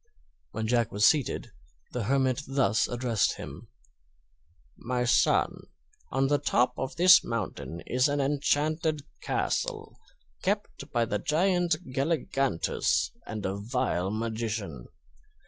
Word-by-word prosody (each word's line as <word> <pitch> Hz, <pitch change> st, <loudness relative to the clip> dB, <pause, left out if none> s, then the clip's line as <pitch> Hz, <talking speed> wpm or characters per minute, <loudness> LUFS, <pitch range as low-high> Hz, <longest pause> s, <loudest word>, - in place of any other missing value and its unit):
When 110 Hz, -, -4 dB
Jack 115 Hz, 0 st, +1 dB
was 105 Hz, 0 st, +3 dB
seated 125 Hz, -3 st, +2 dB, 0.4 s
the 125 Hz, -4 st, -3 dB
hermit 130 Hz, +1 st, +1 dB
thus 110 Hz, -6 st, +2 dB
addressed 120 Hz, -4 st, 0 dB
him: -, -, -9 dB, 1.1 s
"My 125 Hz, +1 st, -2 dB
son, 120 Hz, -, +2 dB, 0.5 s
on 135 Hz, +1 st, +1 dB
the 145 Hz, +1 st, +2 dB
top 125 Hz, -3 st, +2 dB
of 130 Hz, -, -4 dB
this 180 Hz, +2 st, +7 dB
mountain 95 Hz, -6 st, -4 dB
is 125 Hz, +3 st, +2 dB
an 145 Hz, 0 st, 0 dB
enchanted 150 Hz, +2 st, 0 dB, 0.2 s
castle, -, -, -2 dB, 0.4 s
kept -, -, -2 dB
by 120 Hz, -1 st, +2 dB
the 105 Hz, -2 st, -2 dB
Giant 175 Hz, -, +2 dB, 0.2 s
Galligantus 135 Hz, -, 0 dB, 0.2 s
and 105 Hz, -2 st, -5 dB
a 95 Hz, +1 st, -1 dB
vile 100 Hz, -4 st, -1 dB
magician. 110 Hz, -, -3 dB
125 Hz, 115 wpm, -28 LUFS, 110-140 Hz, 1.1 s, this